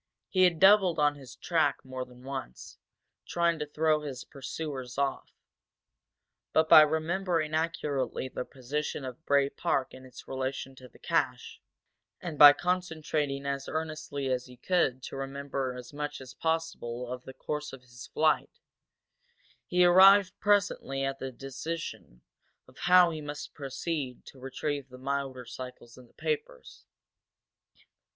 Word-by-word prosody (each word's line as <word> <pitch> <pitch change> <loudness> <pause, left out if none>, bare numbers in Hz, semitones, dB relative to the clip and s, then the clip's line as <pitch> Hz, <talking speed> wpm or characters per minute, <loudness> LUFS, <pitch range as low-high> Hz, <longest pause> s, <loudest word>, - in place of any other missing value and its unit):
He 185 -2 +4
had 170 -3 +2
doubled 190 -3 +6
on 150 -1 +3
his 135 -4 -12
track 160 -6 0
more 130 -1 -5
than 125 0 -17
once, 135 - -7 0.5
trying 170 -1 +1
to 150 - -3
throw 155 +1 +1
his 135 -4 -6
pursuers 135 -2 -6
off. 140 -1 -1 1.2
But 160 0 +4
by 155 - +10
remembering 160 +1 0
accurately 150 -5 -1
the 130 - -5
position 135 +3 -4
of 130 +4 -8
Bray 140 -1 +4
Park 135 -1 -1
in 130 - -11
its 130 -1 -13
relation 130 0 -4
to 125 -1 -13
the - - -19
cache, - - -1 0.6
and 165 -5 -6
by 145 -1 +12
concentrating 155 -4 -2
as 140 0 -3
earnestly 155 -3 -4
as 125 0 -1
he 125 0 -14
could 130 -4 +1
to - - -7
remember 135 -1 -3
as 125 +2 -10
much 145 0 -4
as 130 -1 -10
possible 160 -7 -2
of 125 0 -6
the 130 - -9
course 150 0 -4
of 135 - -10
his 120 0 -12
flight, 155 -1 +1 1.1
he 180 0 +4
arrived 190 +2 +7
presently 200 -10 +1
at 135 0 -3
a 135 - -4
decision 135 - -7 0.4
of - - -19
how 180 -1 +7
he 155 -1 -5
must 145 0 -7
proceed 135 -1 -4
to 135 - -13
retrieve 135 +1 -4
the 125 - -11
motorcycles 130 -3 -5
and 125 -2 -16
the - - -29
papers. - - -4
145 Hz, 145 wpm, -29 LUFS, 130-160 Hz, 1.2 s, by